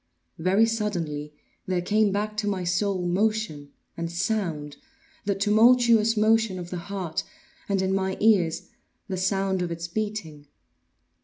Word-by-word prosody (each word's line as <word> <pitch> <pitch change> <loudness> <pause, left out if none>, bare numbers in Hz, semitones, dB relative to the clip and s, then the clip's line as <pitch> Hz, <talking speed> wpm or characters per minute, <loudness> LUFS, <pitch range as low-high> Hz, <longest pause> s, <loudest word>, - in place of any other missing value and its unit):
Very 190 +6 +4
suddenly 175 -10 -2 0.4
there 180 -2 0
came 210 +2 +2
back 210 +2 -2
to 210 -1 -1
my 195 -3 -1
soul 180 +1 0
motion 190 -6 -1 0.2
and 170 0 -4
sound—the 200 - -4
tumultuous 225 +2 +4
motion 220 -2 +3
of 175 -1 -7
the 180 - -3
heart, 185 -5 -3 0.5
and, 195 -1 +1
in 190 0 0
my 190 -1 -1
ears, 195 -7 +2 0.4
the 190 -2 -3
sound 190 0 0
of 175 - -1
its 170 0 -4
beating. 170 -7 -4
195 Hz, 135 wpm, -26 LUFS, 175-215 Hz, 0.5 s, Very